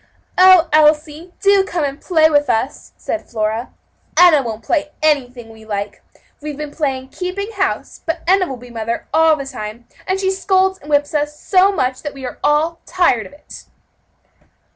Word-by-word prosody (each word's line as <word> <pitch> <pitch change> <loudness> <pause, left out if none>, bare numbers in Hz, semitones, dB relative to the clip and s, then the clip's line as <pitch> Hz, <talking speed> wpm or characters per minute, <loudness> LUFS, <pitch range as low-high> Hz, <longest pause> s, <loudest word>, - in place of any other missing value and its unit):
"Oh, 370 -2 +7
Elsie, 305 +2 +2
do 400 -1 +4
come 350 -4 -3
and 280 0 -4
play 315 -4 +3
with 290 -3 +1
us," 235 +4 -2
said 330 - -5
Flora; 220 +1 -2 0.5
"Enna 345 -5 +7
won't 225 -3 -6
play 300 -3 -1
anything 250 -6 0
we 220 0 -15
like. 205 -1 -5 0.4
We've 295 -1 -6
been 300 -1 -6
playing 265 -4 -3
keeping 380 +7 -5
house, 385 -3 -3
but 325 - -3
Enna 375 0 +3
will 265 - -6
be 245 0 -13
mother 230 0 -4
all 320 0 +5
the 280 -2 -6
time, 235 -3 -8 0.2
and 375 +1 0
she 380 -1 +1
scolds 380 0 +1
and 295 - -14
whips 290 0 +1
us 295 0 -2
so 385 +1 +3
much 255 -9 -2
that 290 -2 -6
we 270 -1 -8
are - - -7
all 315 +3 +1
tired 350 -11 +1
of - - -18
it." 295 - -13
300 Hz, 180 wpm, -18 LUFS, 255-360 Hz, 0.5 s, Oh